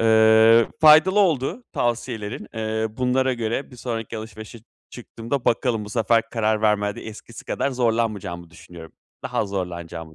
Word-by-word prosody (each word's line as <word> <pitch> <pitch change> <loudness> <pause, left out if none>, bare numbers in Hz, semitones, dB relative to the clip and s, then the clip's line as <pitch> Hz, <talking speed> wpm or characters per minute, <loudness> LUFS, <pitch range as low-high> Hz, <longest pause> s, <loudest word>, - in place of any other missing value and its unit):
Eee, 110 0 +5
faydalı 160 +6 +6
oldu 175 - 0
tavsiyelerin. 120 -2 -3
Eee, 110 0 -2
bunlara 130 +1 +1
göre 120 +4 -3
bir 125 - -13
sonraki 115 -2 -5
alışverişe 110 +1 -10 0.3
çıktığımda, 120 +2 -5
bakalım, 115 -2 0
bu 105 - -10
sefer 115 0 +2
karar 110 -1 0
vermede 105 -1 0
eskisi 110 +1 -11
kadar 140 - -2
zorlanmayacağımı 110 -8 -2
düşünüyorum. 85 -1 -13 0.3
Daha - - -3
az 100 - 0
zorlanacağımı 85 -4 -6
115 Hz, 135 wpm, -22 LUFS, 105-125 Hz, 0.3 s, faydalı